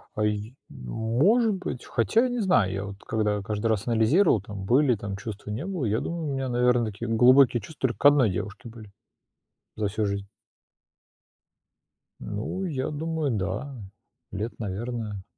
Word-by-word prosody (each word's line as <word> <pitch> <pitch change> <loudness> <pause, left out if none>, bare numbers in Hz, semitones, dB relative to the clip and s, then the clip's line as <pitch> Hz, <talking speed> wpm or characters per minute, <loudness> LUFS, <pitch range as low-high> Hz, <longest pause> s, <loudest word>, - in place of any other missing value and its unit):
Ай 105 +2 -1 0.2
может 130 - +1
быть. 180 -9 -5
Хотя, 225 - +2
не 245 -1 -2
знаю, 180 - +3
я 95 +1 -3
вот 100 0 -8
когда 105 -2 0
каждый 105 +3 -2
раз 110 0 0
анализировал, 115 - +3
там 100 -1 -7
были 125 +2 +4
там 100 -1 -5
чувства, 105 0 -7
не 125 - -4
было, 180 -10 -2
я 110 +2 0
думаю, 170 -3 -3
у - - -2
меня, 135 -1 -2
наверно, 125 -1 +3
такие 110 +3 -5
глубокие 125 +1 +5
чувства 135 +3 -2
только 110 - -6
к - - -5
одной 145 -6 +6
девушке 100 +6 -5
были 110 -3 -12 0.9
за 105 -2 0
всю 105 +1 -1
жизнь. 100 0 -3 1.9
Ну, 110 - -4
я 135 -6 -2
думаю, 155 -1 -2
да, 100 +9 -3 0.6
лет, 105 +4 -4
наверно, 105 -1 -4
115 Hz, 155 wpm, -26 LUFS, 105-140 Hz, 1.9 s, одной